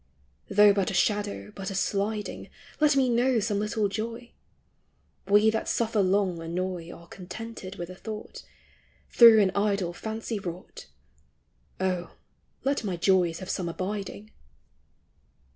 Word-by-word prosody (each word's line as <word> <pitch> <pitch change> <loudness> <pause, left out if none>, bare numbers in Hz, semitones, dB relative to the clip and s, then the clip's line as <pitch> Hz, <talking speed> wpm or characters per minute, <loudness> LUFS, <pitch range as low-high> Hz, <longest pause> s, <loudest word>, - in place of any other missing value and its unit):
Though 205 0 +6
but 195 0 0
a 195 - -3
shadow, 205 +2 0
but 195 0 -5
a 195 - -5
sliding, 205 +2 -2 0.3
Let 300 -2 +4
me 265 -2 +3
know 245 0 +2
some 205 -1 -1
little 215 0 0
joy! 230 +4 -5 1.0
We 210 +2 +5
that 220 - -2
suffer 225 -2 +1
long 185 -2 +1
annoy 175 0 -4
Are 170 - -13
contented 190 +2 -8
with 175 +1 -6
a - - -9
thought, 215 +2 -8 0.7
Through 230 -2 +8
an 190 - +1
idle 200 -4 0
fancy 220 +3 -4
wrought: 175 - -8 0.9
O, 185 -2 -2 0.5
let 275 -2 0
my 190 -4 -2
joys 180 -2 +2
have 185 - -7
some 175 -2 -2
abiding 200 +4 -5
200 Hz, 135 wpm, -27 LUFS, 185-220 Hz, 1.0 s, Through